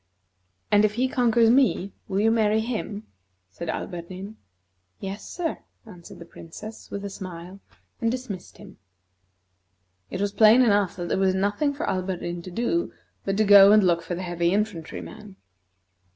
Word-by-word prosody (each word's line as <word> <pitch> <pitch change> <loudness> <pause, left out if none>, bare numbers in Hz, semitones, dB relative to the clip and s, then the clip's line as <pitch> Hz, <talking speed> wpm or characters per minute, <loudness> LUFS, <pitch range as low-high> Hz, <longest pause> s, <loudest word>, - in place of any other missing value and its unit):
"And 205 0 +5
if 210 0 +1
he 255 +2 +1
conquers 235 -3 +3
me, 245 -7 +2 0.2
you 190 - -3
will 215 +3 +3
marry 220 -1 +2
him?" 220 -2 -4 0.5
said 170 - -7
Alberdin. 185 +5 -6 0.6
"Yes, 195 +2 -7
sir," 335 -3 -3 0.3
answered 180 -6 -13
the 170 - -11
Princess, 210 +7 -11
with 200 0 -5
a - - -4
smile, 185 0 -9 0.4
and 230 - +2
dismissed 230 -7 -6
him. 195 -2 -14 1.3
It - - -5
was 200 0 0
plain 220 +4 +6
enough 205 -5 +2
that 175 -1 -5
there - - 0
was 190 -1 +2
nothing 205 +10 0
for 315 +5 -4
Alberdin 180 -2 -3
to 185 - -9
do 240 - -1 0.3
but 195 0 -1
to 215 - +4
go 200 -1 +8
and 210 -1 +6
look 170 -2 +2
for 170 +2 -5
the 185 - -5
heavy 175 -1 0
infantry 200 -6 -2
man. 210 -3 -11
200 Hz, 165 wpm, -25 LUFS, 185-220 Hz, 1.3 s, go